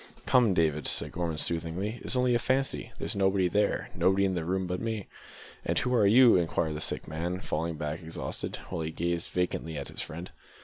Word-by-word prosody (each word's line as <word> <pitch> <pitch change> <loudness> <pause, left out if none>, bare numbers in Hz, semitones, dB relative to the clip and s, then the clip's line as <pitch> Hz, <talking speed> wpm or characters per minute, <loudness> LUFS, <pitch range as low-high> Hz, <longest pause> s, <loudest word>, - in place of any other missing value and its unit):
"Come, 120 -7 +4
David," 75 -3 +2
said - - +1
Gorman 85 -2 -2
soothingly, 85 +8 -1
"it's - - 0
only 125 -1 +3
a 120 - +3
fancy 130 +3 0
there's - - -3
nobody 95 -1 +2
there 100 +3 0
nobody 95 +1 +3
in 95 - +1
the 85 -3 -2
room 95 +3 -1
but 90 0 -3
me." 110 -3 -3 0.6
"And - - -1
who 125 - +1
are 110 -5 +5
you?" 120 +1 +7
inquired 80 -2 0
the 75 - -4
sick - - -1
man, 85 +4 -3
falling 80 -1 -2
back 75 +2 -4
exhausted, 80 0 -4
while 90 -3 -3
he 80 - -2
gazed 85 +1 -1
vacantly 85 -3 -2
at 70 - -5
his - - -4
friend. 85 +4 -7
90 Hz, 205 wpm, -29 LUFS, 80-100 Hz, 0.6 s, you